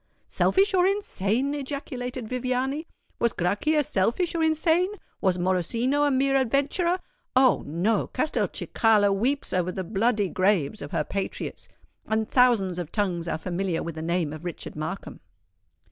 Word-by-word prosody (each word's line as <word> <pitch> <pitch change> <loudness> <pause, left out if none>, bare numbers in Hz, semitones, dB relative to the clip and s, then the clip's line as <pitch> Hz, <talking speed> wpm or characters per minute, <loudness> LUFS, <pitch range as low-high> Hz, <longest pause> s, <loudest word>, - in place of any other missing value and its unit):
"Selfish 390 +1 +2
or 365 -1 +4
insane!" 275 - 0
ejaculated 260 -4 -5
Viviani. 255 +5 -2 0.3
"Was 235 - +2
Grachia 295 - +1
selfish 240 - +1
or 335 - -1
insane? 320 +3 +2 0.3
was 185 -2 +2
Morosino 230 - +1
a - - +3
mere 270 0 +2
adventurer? 285 - +1 0.4
Oh! 260 -1 +5
no—Castelcicala 210 - +1
weeps 255 +8 -1
over 180 0 +1
the 190 - -4
bloody 210 +2 +1
graves 185 0 +1
of 145 - -6
her 150 - 0
patriots; 195 +5 -5 0.4
and 220 0 0
thousands 225 -9 +3
of 170 -3 -5
tongues 180 -5 -1
are 165 - -1
familiar 180 +1 -2
with 170 - -5
the 160 - -6
name 165 -2 -1
of 155 +1 -9
Richard 175 -2 -6
Markham." 155 +6 -5
225 Hz, 140 wpm, -26 LUFS, 185-275 Hz, 0.4 s, Oh